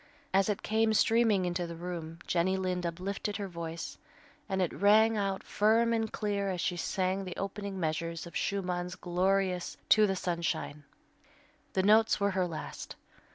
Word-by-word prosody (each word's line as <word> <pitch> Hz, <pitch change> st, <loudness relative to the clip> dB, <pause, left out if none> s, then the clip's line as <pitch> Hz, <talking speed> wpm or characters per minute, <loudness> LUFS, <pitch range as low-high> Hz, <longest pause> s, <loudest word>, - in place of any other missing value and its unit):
As 195 Hz, +1 st, +3 dB
it 205 Hz, -, -2 dB
came 220 Hz, 0 st, +2 dB
streaming 225 Hz, -4 st, +3 dB
into 175 Hz, 0 st, -1 dB
the 170 Hz, -, -7 dB
room, 165 Hz, -1 st, -6 dB
Jenny 185 Hz, +2 st, +1 dB
Lind 180 Hz, -2 st, -1 dB
uplifted 195 Hz, +4 st, -3 dB
her 200 Hz, -2 st, -4 dB
voice, 170 Hz, -2 st, -6 dB, 0.5 s
and 190 Hz, -1 st, 0 dB
it 180 Hz, -3 st, 0 dB
rang 220 Hz, +2 st, +5 dB
out 195 Hz, -2 st, -1 dB
firm 225 Hz, +2 st, +3 dB
and 225 Hz, -1 st, 0 dB
clear 200 Hz, -2 st, -1 dB
as 185 Hz, -2 st, -2 dB
she 175 Hz, +1 st, 0 dB
sang 185 Hz, +2 st, -1 dB
the 180 Hz, -2 st, -7 dB
opening 200 Hz, 0 st, -4 dB
measures 165 Hz, 0 st, -2 dB
of 170 Hz, -, -11 dB
Schumann's 180 Hz, -2 st, -2 dB
glorious 185 Hz, 0 st, 0 dB
"To 215 Hz, -1 st, +6 dB
the 195 Hz, -, 0 dB
Sunshine." 170 Hz, -5 st, -2 dB, 0.9 s
The 190 Hz, -, +1 dB
notes 215 Hz, +2 st, +5 dB
were 200 Hz, 0 st, +2 dB
her 185 Hz, -1 st, 0 dB
last. 160 Hz, -2 st, -7 dB
190 Hz, 160 wpm, -31 LUFS, 175-205 Hz, 0.9 s, To